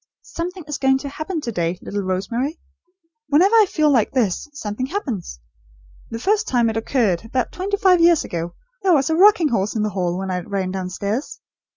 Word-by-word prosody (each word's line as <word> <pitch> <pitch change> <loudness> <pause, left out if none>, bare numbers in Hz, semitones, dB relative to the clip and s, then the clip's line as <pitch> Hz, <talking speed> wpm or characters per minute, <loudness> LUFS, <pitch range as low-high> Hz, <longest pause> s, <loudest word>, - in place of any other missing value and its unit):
"Something 355 +1 -6
is 295 -2 -5
going 265 -1 +3
to 280 +1 -6
happen 310 +3 -4
to 235 - -4
day, 170 -3 -1
little 205 0 -4
Rosemary. 230 - -2 0.7
Whenever 335 +8 +4
I 430 -2 +6
feel 305 -2 +2
like 235 -6 +2
this, 240 - 0
something 255 -2 -4
happens. 250 - -4 0.7
The 230 - -5
first 415 - +1
time 240 -3 +2
it 220 - -4
occurred, 225 -6 0
about 250 +3 -2
twenty 395 +3 -2
five 375 -4 +4
years 335 -2 +5
ago, 170 0 -5 0.3
there 380 -3 +3
was 280 +2 +1
a - - +2
rocking 365 -3 +5
horse 210 -3 -1
in 215 - 0
the 215 - -1
hall, 180 -2 -1
when 190 0 -3
I 180 - -1
ran 190 0 -3
downstairs! 195 +6 -4
255 Hz, 195 wpm, -21 LUFS, 195-325 Hz, 0.7 s, I